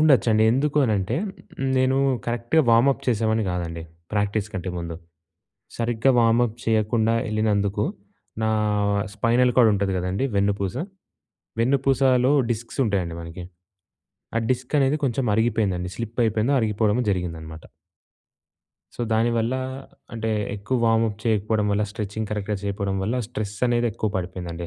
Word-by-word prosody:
ఉండొచ్చండి. 125 -8 +4
ఎందుకు 140 +4 0
అనంటే, 100 -5 0 0.6
నేను 130 +1 +3 0.3
కరెక్ట్‌గా 120 +7 +1
వార్మ్‌అప్ 120 +4 +4
చేసేవాడిని 110 -1 +1
గాదండి. 85 -2 -4 0.3
ప్రాక్టీస్ 105 0 0
కంటే 95 -1 -3
ముందు. 85 -1 -5 0.8
సరిగ్గా 120 +2 +2
వార్మ్‌అప్ 115 0 +2
చేయకుండా 110 0 +2
యెళ్ళినందుకు 105 -2 0 0.6
నా 110 - +2 0.6
స్పైనల్‌కార్డ్ 120 +2 +4
ఉంటది 100 -1 0
గదండీ! 90 +8 -1
వెన్నుపూస. 100 -1 0 0.8
వెన్నుపూసలో 130 0 +3 0.2
డిస్క్స్ 115 +4 -5
ఉంటాయండి 90 -5 -1
మనకి. 85 +2 -8 0.9
ఆ - - +4
డిస్క్ 125 0 -2
అనేది 135 +1 +3
కొంచెం 130 0 0
అరిగిపోయిందండి. 105 -5 0
స్లిప్ 115 0 -6
అయిపోయిందో, 110 +5 +1
అరిగిపోవడమో 110 +1 +1
జరిగిందనమాట. 80 -4 -4 1.3
సో, - - -8
దానివల్ల 115 +2 +1 0.6
అంటే 110 -1 -2 0.3
ఎక్కువ 110 +6 -2
వార్మ్‌అప్ 115 -2 +2
చేయకపోవడం 110 -1 +1
వల్ల, 100 +1 +1
స్ట్రెచింగ్ 105 +1 -4
కరెక్ట్‌గా 105 0 -2
చేయకపోవడం 100 -1 -2
వల్ల 110 +6 -1
స్ట్రెస్ 105 -4 -5
అనేది 120 0 +1
ఎక్కువ 110 0 -2
పడిపోయిందండి 90 -2 -5
110 Hz, 115 wpm, -24 LUFS, 100-120 Hz, 1.3 s, ఉండొచ్చండి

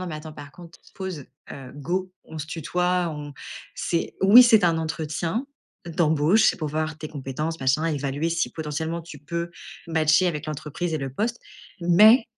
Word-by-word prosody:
nan, 185 - -4
mais 155 - -5
attends 155 +1 -9
par 145 -1 -10
contre, 170 +2 -14 0.2
pause, 185 -8 -6 0.3
heu, 135 -2 -9
go 180 +6 -2
on 160 - -9
se 155 - -5
tutoie, 180 +2 0
on 145 -1 -7 0.4
c'est 170 -1 -2
oui, 210 +6 +10
c'est 220 -5 +5
un 165 -1 +3
entretien, 160 - -2 0.4
d'embauche, 160 +4 +3
c'est - - -7
pour 155 - -3
voir 155 +1 -2
tes 155 - -6
compétences 150 +3 -4
machin, 135 +4 +2
évaluer 145 +1 -1
si 170 0 0
potentiellement 160 +2 -3
tu 155 -2 -11
peux 170 +3 -4 0.4
matcher 160 +2 +3
avec 155 -4 -2
l'entreprise 155 +3 -4
et - - -1
le 135 -2 -5
poste, 230 - -2 0.4
mais 210 +8 +6
160 Hz, 175 wpm, -24 LUFS, 150-175 Hz, 0.4 s, oui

